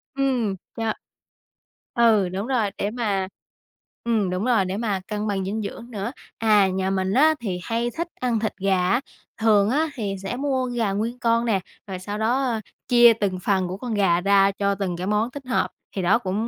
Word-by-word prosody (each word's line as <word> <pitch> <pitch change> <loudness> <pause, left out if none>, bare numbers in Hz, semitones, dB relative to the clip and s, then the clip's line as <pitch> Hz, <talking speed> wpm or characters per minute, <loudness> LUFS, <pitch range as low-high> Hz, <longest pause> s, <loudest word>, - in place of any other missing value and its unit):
Ừm, 255 -7 +1 0.2
cho 225 -1 0 1.0
ừ, 220 -6 +4
đúng 195 +4 -4
rồi, 235 -7 +1
để 205 - -1
mà 205 -5 -1 0.8
ừm, 220 -5 +1
đúng 185 +5 -2
rồi, 230 -7 +3
để 185 +2 -3
mà 210 -4 -1
cân 210 0 -3
bằng 195 -2 -1
dinh 215 +3 -2
dưỡng 230 +3 -7
nữa. 210 +1 -3 0.3
À, 210 -3 +4
nhà 190 0 -1
mình 190 0 0
á, 310 +6 +5
thì 185 -6 -3
hay 230 +5 -1
thích 340 +1 -1
ăn 245 -3 0
thịt 220 0 -2
gà 190 -2 +1
á. 240 +6 +2 0.4
Thường 210 -2 +4
á, 295 +6 +2
thì 200 -5 -3
sẽ 195 - -3
mua 265 -2 0
gà 235 -4 -1
nguyên 225 +5 -2
con 230 0 +2
nè, 205 -4 +2 0.3
rồi 185 -1 -5
sau 205 +3 -5
đó, 240 +5 +1
ơ, 230 -4 -1 0.3
chia 240 -2 +7
từng 200 -4 -2
phần 185 0 +1
của 185 - -5
con 235 +1 -4
gà 185 -4 +3
ra 195 +1 +4
cho 200 0 0
từng 185 -3 -3
cái 185 +2 -4
món 215 +4 +1
thích 280 -2 -9
hợp. 250 - +1 0.3
Thì 190 - -1
đó 195 +6 +3
cũng 210 +1 -2
210 Hz, 210 wpm, -24 LUFS, 195-235 Hz, 1.0 s, chia